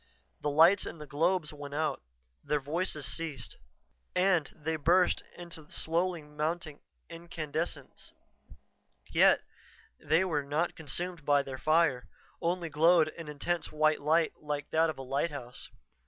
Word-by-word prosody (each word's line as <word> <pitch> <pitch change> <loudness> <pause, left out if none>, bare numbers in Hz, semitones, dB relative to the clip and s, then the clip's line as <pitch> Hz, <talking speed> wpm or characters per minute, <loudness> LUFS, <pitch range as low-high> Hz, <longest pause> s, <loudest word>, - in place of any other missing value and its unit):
The 150 - -1
lights 165 +7 +5
in - - -7
the 150 - -8
globes 160 +2 0
went 145 -1 -7
out; 155 -2 0 0.4
their 150 - +1
voices 150 +1 -2
ceased. 165 -2 -4 0.6
And 180 -4 +3
they 160 +1 -3
burst 175 +4 +3 0.2
into 165 -3 -8
slowly 170 0 -1
mounting 150 +1 -3 0.3
incandescence. 165 -1 -5 1.0
Yet, - - +5 0.6
they 165 +4 +2
were 155 -5 0
not 150 +5 -1
consumed 165 +3 -3
by 145 -1 +3
their 130 -1 -7
fire, 155 -4 +2 0.3
only 175 0 0
glowed 160 +1 +4
an 165 0 -9
intense 150 +4 -2
white 155 0 +2
light 160 +2 +3
like 150 -1 -4
that 160 +1 +3
of 155 - -4
a 135 - -6
lighthouse. 135 -2 -3
155 Hz, 135 wpm, -31 LUFS, 145-170 Hz, 1.0 s, lights